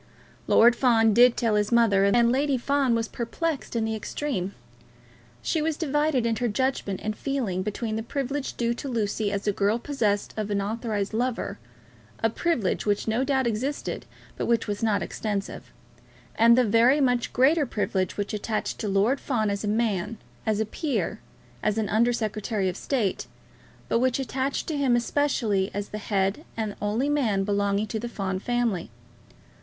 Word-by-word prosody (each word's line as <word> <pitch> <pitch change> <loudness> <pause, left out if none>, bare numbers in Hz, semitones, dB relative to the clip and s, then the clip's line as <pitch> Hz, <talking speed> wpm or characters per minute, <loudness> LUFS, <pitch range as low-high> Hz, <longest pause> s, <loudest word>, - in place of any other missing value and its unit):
Lord 235 +1 +6
Fawn 225 -4 +4
did 245 +2 +6
tell 230 -2 +1
his 210 +1 +1
mother, 220 -5 +4
and 235 +4 +4
Lady 275 +1 +1
Fawn 270 -1 +1
was 225 0 -1
perplexed 255 +3 -3
in 225 -1 +1
the 220 - -1
extreme. 215 -4 -3 0.9
She 320 - 0
was 310 -1 -1
divided 295 -4 +1
in 230 -1 +1
her 245 - 0
judgment 220 -4 -1
and 215 0 -2
feelings 230 -11 -2
between 215 +1 -3
the - - -2
privilege 275 +3 -3
due 235 0 +1
to 245 - -6
Lucy 215 -3 -1
as 200 0 -3
a 205 - +3
girl 205 +3 +1
possessed 230 -6 -1
of 215 -1 -3
an 200 -1 0
authorised 210 0 -2
lover, 240 +2 -2 0.6
a 225 - +3
privilege 250 - 0
which 205 +1 0
no 225 +4 +1
doubt 265 -2 +1
existed, 235 +6 -2 0.3
but - - -2
which 235 -2 +2
was 205 -1 -3
not 215 -3 +1
extensive, 205 -2 -4 0.6
and 235 +1 +5
the 255 - +5
very 235 +6 +4
much 245 -3 +1
greater 285 +3 +3
privilege 190 -4 -1
which 205 0 -3
attached 215 +1 -2
to 215 - -2
Lord 205 +7 +2
Fawn 220 -6 0
as 200 +1 -3
a - - -2
man, 215 -1 0 0.3
as 215 -1 +1
a 220 - +1
peer, 285 +6 -2 0.4
as 215 0 0
an 215 -2 0
Under 235 +3 +3
Secretary 215 -3 -1
of 180 - -2
State, 230 -9 -1 0.6
but - - +2
which 255 0 +2
attached 270 0 -2
to 310 - -1
him 265 -4 +3
especially 235 -6 +1
as 205 0 -3
the 210 - -5
head 200 +5 0
and 215 -2 -2
only 215 +6 0
man 240 -10 +1
belonging 200 +1 +1
to 220 0 -4
the 240 +2 -4
Fawn 190 -4 -3
family. 235 -5 -1
225 Hz, 175 wpm, -26 LUFS, 205-255 Hz, 0.9 s, Lord